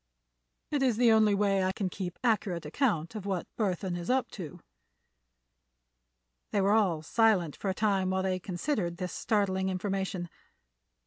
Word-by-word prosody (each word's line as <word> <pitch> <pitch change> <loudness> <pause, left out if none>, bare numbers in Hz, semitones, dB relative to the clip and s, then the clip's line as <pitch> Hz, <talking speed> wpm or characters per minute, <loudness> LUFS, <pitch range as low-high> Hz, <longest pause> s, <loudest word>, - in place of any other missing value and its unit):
It 290 -2 0
is 250 -5 +2
the 240 -1 +5
only 215 -2 +5
way 195 -1 +2
I 185 - +1
can 195 -1 -2
keep 180 -1 -5
accurate 195 -8 0
account 170 - 0
of 210 -3 -6
what 190 -3 -1
Burthon 185 -4 -1
is 175 0 -5
up 260 0 +1
to." 175 -2 -8 1.9
They 205 - +1
were 195 +1 +3
all 185 -8 +2
silent 195 -4 +2
for 200 - -3
a 190 - -1
time 195 -3 +1
while 190 0 0
they 185 -1 0
considered 180 - -2
this 180 0 -4
startling 190 -3 0
information. 190 -1 -2
190 Hz, 155 wpm, -30 LUFS, 180-215 Hz, 1.9 s, the